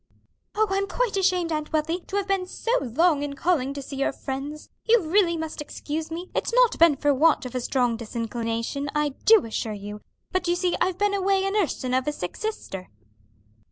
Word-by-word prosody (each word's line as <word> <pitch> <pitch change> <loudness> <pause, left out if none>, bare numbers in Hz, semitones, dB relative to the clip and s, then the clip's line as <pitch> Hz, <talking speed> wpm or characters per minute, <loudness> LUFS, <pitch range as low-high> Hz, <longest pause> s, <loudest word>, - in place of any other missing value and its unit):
"Oh, 435 +1 +4
I'm 395 +1 +1
quite - - -1
ashamed, 365 -3 +1
Aunt 305 -1 -2
Wealthy, 315 +3 0
to 395 - -5
have 400 -1 0
been 385 -2 0
so 455 - -3
long 290 +5 +2
in 290 -1 -3
calling 285 -4 +1
to 280 - -5
see 275 0 -7
your 275 - +1
friends; 275 +3 -6 0.2
you 470 +1 +7
really 340 -1 +2
must 320 -1 -5
excuse 310 +1 -5
me; 345 +3 -6
it's - - -1
not - - +4
been 330 -3 +7
for 290 +1 +2
want 305 +1 +3
of 250 - -6
a 255 - -1
strong 245 -2 +1
disinclination, 230 +4 -3
I 300 0 +2 0.2
do 440 - +7
assure 220 -1 -3
you: 205 +1 -7 0.3
but 370 -1 0
you 345 - +2
see 360 0 0
I've 365 -1 +1
been 410 0 +1
away 390 0 +2
a 390 - 0
nursing 330 -11 0
of 260 +1 +1
a - - +2
sick 180 -11 -5
sister." 195 - -5
315 Hz, 205 wpm, -25 LUFS, 265-375 Hz, 0.3 s, you